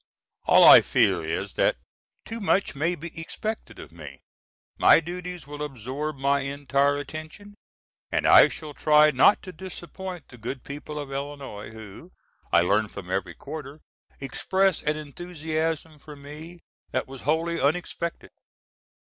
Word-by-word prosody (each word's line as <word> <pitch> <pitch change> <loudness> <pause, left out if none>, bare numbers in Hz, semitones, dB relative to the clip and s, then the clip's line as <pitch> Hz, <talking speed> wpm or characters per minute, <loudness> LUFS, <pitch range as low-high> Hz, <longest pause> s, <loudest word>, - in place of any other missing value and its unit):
All - - +6
I - - +11
fear - - +2
is - - -3
that - - +3 0.5
too 225 0 -6
much 200 -1 +1
may 160 +5 0
be 170 0 -8
expected 215 +6 -5
of - - -11
me. 75 -5 -11 0.6
My - - +7
duties 175 -1 -7
will 145 +1 -8
absorb 140 +2 -4
my 140 +1 +2
entire 140 +1 0
attention, 155 +8 -8 0.6
and - - 0
I - - +8
shall 155 -2 -8
try 150 +1 +5
not 140 +9 +5
to 185 - -8
disappoint 180 -1 -8
the 125 - -14
good 125 +4 -5
people 145 +1 -7
of 145 -2 -6
Illinois, 140 -6 -6
who, 110 -3 -12 0.4
I - - +6
learn 105 +5 +2
from 95 -3 -9
every 95 -3 -2
quarter, 145 0 -8 0.4
express 190 +7 0
an 150 +1 -1
enthusiasm 160 0 -4
for 150 0 -11
me 155 +5 -11 0.3
that - - -2
was 135 -1 -10
wholly 165 +3 0
unexpected. 170 +3 -2
150 Hz, 145 wpm, -26 LUFS, 135-170 Hz, 0.6 s, I